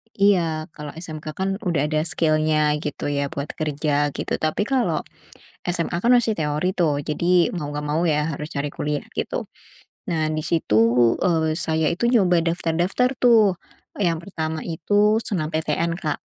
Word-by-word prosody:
Iya 200 -2 +4 0.4
kalau 150 -1 -7
SMK 160 -2 -7
kan 190 - 0 0.2
udah 165 -5 +1
ada 155 0 0
skill-nya, 155 -1 +2 0.3
gitu 150 - -5
ya 140 - +1
buat 140 +1 -4
kerja 150 -1 -1 0.2
gitu. - - -3
Tapi 155 +4 0
kalau, 260 -3 +1 0.7
SMA 170 0 0
kan 240 - +3
masih 230 -2 +2
teori 150 +2 -1
tuh, 165 -4 +3 0.2
jadi 150 +2 -2 0.3
mau 150 -4 -4
nggak 150 0 -4
mau 155 +3 +1
ya 150 - +1
harus 150 +1 -5
cari 145 0 -1
kuliah 150 0 -2
gitu. - - -2 0.6
Nah, 165 -2 0
di 155 - -2
situ, 160 -10 +1 0.5
eee, 160 -3 +2
saya 160 0 +1
itu 175 - -5
nyoba 180 -8 +4
daftar-daftar 175 +8 +1
tuh. 235 -3 +6 0.6
Yang 170 -5 +1
pertama 160 -4 -3
itu 205 +6 +2
SNMPTN, 160 -4 -1
Kak. 155 -4 -2
160 Hz, 155 wpm, -23 LUFS, 155-180 Hz, 0.7 s, tuh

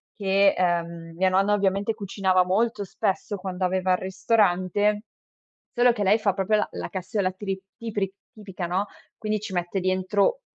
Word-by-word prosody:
che, 195 -1 +3
ehm, 170 -2 -1
mia 185 +2 +3
nonna 195 +2 +3
ovviamente 200 +2 +1
cucinava 195 -3 +1
molto 210 +3 +1
spesso 200 +1 -2
quando 185 0 -3
aveva 185 0 +1
il - - +2
ristorante, 205 +1 +1 0.7
solo 245 0 +4
che 220 - -3
lei 205 +3 +4
fa 210 -3 +1
proprio 200 +2 +1
la - - 0
la - - -5
cassoeula 190 +1 -1
tri 195 0 -4 0.2
tipri 205 -4 -3 0.2
tipica, 195 -5 -6
no, 185 +4 0 0.3
quindi 215 0 -1
ci 215 -2 -7
mette 175 +1 -1
dentro 185 - +1
195 Hz, 160 wpm, -25 LUFS, 185-210 Hz, 0.7 s, solo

